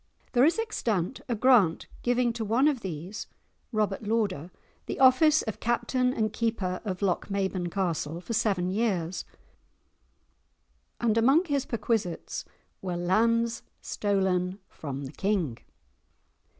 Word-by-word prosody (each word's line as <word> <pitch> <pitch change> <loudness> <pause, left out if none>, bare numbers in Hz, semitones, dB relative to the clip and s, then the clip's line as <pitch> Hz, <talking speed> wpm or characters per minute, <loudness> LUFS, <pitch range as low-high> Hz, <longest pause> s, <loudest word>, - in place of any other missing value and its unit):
There 250 +1 +5
is 330 - +3
extant 240 - -1
a 240 - +1
grant 215 -8 +4 0.2
giving 245 -1 +2
to 230 -1 -3
one 235 +7 +3
of 290 -4 +1
these, 185 0 -6 0.4
Robert 210 -3 0
Lauder, 205 -7 -1 0.4
the - - -4
office 280 +4 +6
of 220 - -5
Captain 240 +2 +1
and 215 -3 -1
Keeper 210 -6 -1
of 195 -2 -4
Lochmaben 190 -1 -1
Castle 170 -4 -2
for 210 +6 -5
seven 195 -5 +1
years, 185 -5 -1 1.7
and 230 -1 +2
among 275 +10 +4
his 285 -5 -1
perquisites 215 -5 -2 0.4
were 180 -2 -3
"lands 230 +6 +2 0.2
stolen 190 -2 0
from 140 -2 -6
the 135 - -7
King"! 180 - -1
210 Hz, 125 wpm, -28 LUFS, 180-235 Hz, 1.7 s, office